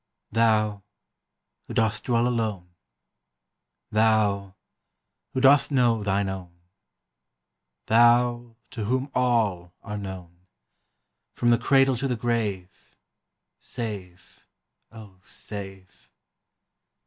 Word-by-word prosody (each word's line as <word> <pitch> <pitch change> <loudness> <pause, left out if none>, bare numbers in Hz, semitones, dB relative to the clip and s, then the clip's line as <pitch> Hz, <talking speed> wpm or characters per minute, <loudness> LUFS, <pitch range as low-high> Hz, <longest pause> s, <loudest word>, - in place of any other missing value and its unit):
Thou, 110 -2 +2 0.9
who - - -7
dost 110 -1 0
dwell 120 -1 +2
alone; 110 -7 -2 1.2
Thou, 105 -3 +1 0.8
who - - -2
dost 140 +2 +5
know 120 -5 +2
thine 100 0 0
own; 95 -2 -7 1.3
Thou, 120 +1 +3 0.2
to 115 -6 -5
whom 130 +5 -1
all 110 -9 0
are 105 -1 -5
known, 90 -2 -9 0.9
From 120 - +2
the 120 - +3
cradle 135 +1 +3
to 135 +3 -2
the 125 - -1
grave, 110 -6 -3 0.6
Save, 95 -6 -8 0.4
O, 105 -5 -13
save! 95 -3 -7
110 Hz, 90 wpm, -25 LUFS, 95-120 Hz, 1.3 s, dost